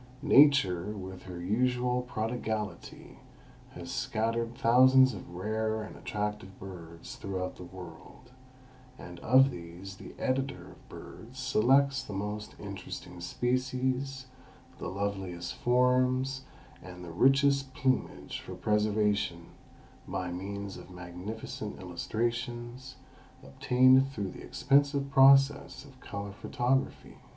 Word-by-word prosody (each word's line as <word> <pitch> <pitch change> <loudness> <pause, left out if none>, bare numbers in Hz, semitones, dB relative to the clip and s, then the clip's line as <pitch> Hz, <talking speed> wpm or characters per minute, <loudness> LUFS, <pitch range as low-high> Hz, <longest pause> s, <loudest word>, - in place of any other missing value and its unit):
Nature 135 - +5
with 95 -1 -8
her 90 -2 -7
usual 125 +6 +1
prodigality 110 -3 -4 0.5
has - - -8
scattered 115 +2 -1
thousands 130 +1 +6
of 90 -3 -9
rare 110 +3 -1
and 110 - -9
attractive 105 -2 -4
birds 85 -3 -9
throughout 95 -1 -4
the - - -9
world, 90 +7 -12 0.7
and 90 -6 -10
of 130 +7 +5
these 90 0 -9
the 100 - -11
editor 135 +1 -2
of - - -19
BIRDS 120 +4 -11
selects 135 +2 +3
the 105 - -8
most 105 +2 -4
interesting 95 -3 -8
species, 130 +5 -1 0.5
the - - -4
loveliest 95 -3 -3
forms 130 +2 +2 0.4
and 90 -1 -10
the 85 - -8
richest 135 - +3
plumage 130 -1 -1
for - - -8
preservation 105 -5 0 0.6
by 90 -2 -3
means 100 +2 -5
of - - -12
magnificent 90 +4 -7
illustrations, 120 +7 -4 0.5
obtained 130 +2 +4
through 100 -8 -4
the - - -11
expensive 140 0 +2
process 135 0 +5
of 135 -2 -16
color 100 -3 -6
photography. 125 +6 -1
110 Hz, 110 wpm, -30 LUFS, 95-130 Hz, 0.7 s, thousands